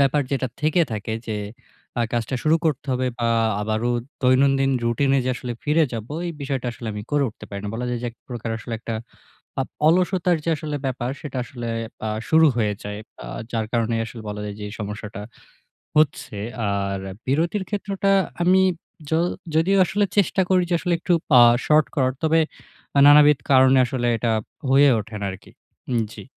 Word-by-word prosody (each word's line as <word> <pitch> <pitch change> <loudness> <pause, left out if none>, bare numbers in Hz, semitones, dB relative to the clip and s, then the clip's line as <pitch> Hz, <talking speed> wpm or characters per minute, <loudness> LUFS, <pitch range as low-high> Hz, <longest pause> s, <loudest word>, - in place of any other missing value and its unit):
ব্যাপার 140 +1 +3
যেটা 135 -2 0
থেকে 155 +3 +2
থাকে 110 +1 -4
যে, 110 -2 -2 0.6
আ - - +2
কাজটা 120 +2 -1
শুরু 155 +1 +4
করতে 150 -4 0
হবে। 130 0 0
বা 115 - +1 0.3
আবারও 110 +3 -1 0.3
দৈনন্দিন 135 +1 +4
রুটিনে 135 +4 +2
যে 130 - +1
আসলে 125 -1 -5
ফিরে 155 +2 +3
যাবো। 115 +4 -5
এই 170 - -3
বিষয়টা 135 -3 -3
আসলে 120 - -9
আমি 105 0 -5
করে 145 -1 +2
উঠতে 110 - -12
পারি 100 -1 -6
না। 105 - -3
বলা 125 +2 -3
যায় 125 -1 -2
যে 120 - -2
এক - - -23
প্রকার 120 -2 -5
আসলে 115 - -8
একটা 115 0 -5 0.7
আ - - +3 0.3
অলসতার 180 0 +3
যে 170 - -1
আসলে 150 0 -4
ব্যাপার 125 -2 -2
সেটা 140 -4 -6
আসলে 120 -1 -7 0.4
আ - - -1 0.2
শুরু 160 0 +6
হয়ে 105 -3 +1
যায়। 105 +1 -5 0.3
আ - - -8 0.2
যার 115 -2 -1
কারণে 115 -1 0
আসলে 115 0 -9
বলা 105 0 -5
যায় 105 -1 -6
যে - - -6
এই - - -9
সমস্যাটা 105 0 -6 0.8
হচ্ছে। 145 -8 +1 0.3
আর 100 -1 -1 0.3
বিরতির 165 +9 +1
ক্ষেত্রটা 200 -1 -1 0.3
আমি 185 +2 +5 0.5
য - - -11 0.4
যদিও 180 +5 +3
আসলে 200 +3 +1
চেষ্টা 195 -1 +3
করি 185 -1 +4
যে, - - +1
আসলে 175 -1 0
একটু 175 - +1 0.3
আ - - +9 0.2
শর্ট 155 0 +4
করার 130 -3 +2
তবে 160 +1 +4 0.6
আ - - +7
নানাবিধ 145 0 +7
কারণে 130 0 +6
আসলে 125 -1 -2
এটা 115 0 0 0.4
হয়ে 140 +2 +6
ওঠে 110 +1 -8
না - - -1
আরকি 95 - -12 0.4
হুম, 120 -2 +1
জি। - - -9
130 Hz, 185 wpm, -23 LUFS, 115-155 Hz, 0.8 s, আ